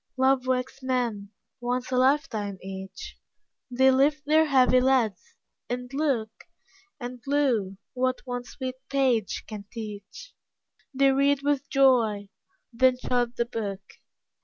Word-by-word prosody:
Love 260 0 +2
wakes 260 +1 -1
men, 240 -6 -2 0.3
once 250 +1 -2
a - - 0
lifetime 255 -7 +1
each; 190 0 -8 0.5
They 265 +1 +4
lift 290 +3 +2
their 310 +2 +4
heavy 255 -2 +4
lids, 250 -7 +1 0.3
and 250 +1 -5
look; 270 -7 0 0.7
And, 245 -1 -7
lo, 245 -10 +1 0.2
what 255 0 0
one 245 -1 -4
sweet 260 0 -6
page 255 -7 +1
can 210 -2 -8
teach, 215 - -9 0.6
They 275 0 +3
read 280 +1 +2
with 285 -1 0
joy, 230 -7 +3 0.4
then 255 +2 +3
shut 245 -1 -1
the 235 - 0
book. 210 -5 -4
255 Hz, 125 wpm, -26 LUFS, 225-270 Hz, 0.7 s, They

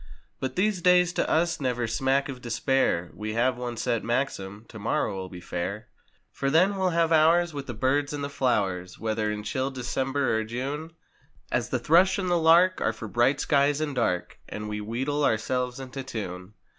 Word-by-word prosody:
But 130 -1 -3
these 195 -1 +1
days 180 -1 +4
to - - 0
us 170 0 +1
never 125 -2 0
smack 135 +4 +1
of 130 -3 -7
despair, 120 -6 0
We 110 0 -5
have 125 +3 +2
one 120 -1 -5
set 115 -1 -1
maxim—"Tomorrow'll 105 -4 -2
be 90 - -9
fair." 90 +5 -4 0.4
For 135 - -2
then, 185 +7 +4
we'll 190 -1 +1
have 165 -1 +1
hours 165 +2 +4
with 140 -1 -6
the 120 - -5
birds 140 +5 +1
and 145 -1 -4
the - - -1
flowers. 95 -10 -1
Whether 110 -1 -1
in 105 0 -4
chill 130 +4 -1
December 130 -1 -1
or - - -1
June; 140 +8 -4 0.6
As - - 0
the - - 0
thrush 180 +4 +4
and 185 -2 -1
the 175 - +3
lark 170 +3 +5
are 115 - +1
for 110 0 -7
bright 120 +6 +2
skies 145 0 +2
and 155 -2 -2
dark 105 -8 -1
And 105 0 -5
we 105 0 -4
wheedle 130 +7 -2
ourselves 125 +1 0
into 135 +1 -6
tune. 100 -6 -6
130 Hz, 180 wpm, -26 LUFS, 110-150 Hz, 0.6 s, lark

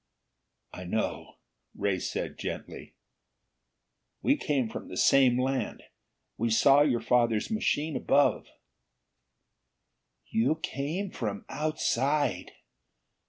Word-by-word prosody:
"I - - -7
know," - - -3 0.4
Ray, - - 0
said - - -4
gently. - - -7 1.3
"We 280 - +4
came 140 - -1
from 110 - -7
the 90 - -8
same 130 0 +5
land. 130 +1 -2 0.5
We 115 +1 0
saw 135 +5 +5
your 130 -5 +2
father's 120 - +1
machine 160 -8 0
above." 145 0 +2 1.8
"You 125 +8 +1
came 160 +9 -3
from 100 -4 -4
outside! 150 -2 -1
135 Hz, 95 wpm, -28 LUFS, 120-150 Hz, 1.8 s, same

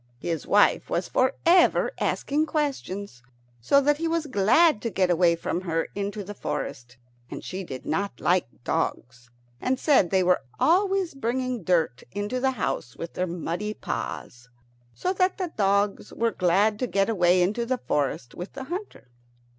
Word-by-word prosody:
His 165 +3 -4
wife 205 0 +3
was - - -1
for 260 +1 +1
ever 345 +1 +5
asking 300 +3 0
questions, 205 - -3 0.4
so 280 - +4
that 295 +1 +2
he 330 - 0
was 330 -1 0
glad 255 - +4
to 230 - -2
get 185 -4 +1
away 170 0 +4
from 170 +1 -3
her 165 -3 -2
into 205 +1 -4
the 205 +2 -7
forest. 125 -9 -5 0.3
And - - -7
she 190 +1 -5
did 130 -7 -8
not 200 +5 -2
like 180 0 +2 0.2
dogs, 120 0 -3 0.3
and 260 +1 0
said 270 - +4
they 190 0 +2
were 180 -3 +3 0.2
always 380 +1 +2
bringing 255 -2 -2
dirt 160 -8 +1
into 205 +5 -2
the 265 +1 +2
house 135 - -3
with 170 - -7
their 185 - -1
muddy 175 +5 -3
paws. 120 0 -6 0.5
So 370 - -1
that 370 0 +1
the 365 -4 -4
dogs 200 0 +1
were 230 0 0
glad 200 +4 +2
to 250 - -1
get 195 -3 +1
away 180 -4 +3
into 210 +6 0
the 255 +2 -1
forest 140 - -2
with 180 +2 -8
the 270 - -6
hunter. 360 - -7
205 Hz, 170 wpm, -26 LUFS, 175-265 Hz, 0.5 s, ever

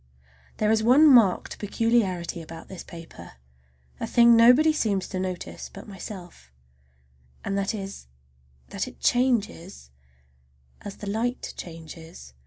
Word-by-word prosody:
There 215 0 +2
is 220 -1 +3
one 255 +7 +6
marked 235 -9 +4
peculiarity 205 -6 0
about 165 0 -11
this 190 -3 -8
paper, 165 -1 -12 0.7
a - - -3
thing 235 -1 +6
nobody 250 +7 +6
seems 200 -10 -1
to 185 - -4
notice 185 -1 -5
but 195 - -11
myself, 180 - -10 0.9
and 195 - -2
that 200 +2 -1
is 195 - -8 0.6
that - - -3
it - - -12
changes 220 - 0 0.9
as 205 - -8
the 205 - -8
light 230 +5 -2
changes. 160 - -11
200 Hz, 125 wpm, -25 LUFS, 175-230 Hz, 0.9 s, one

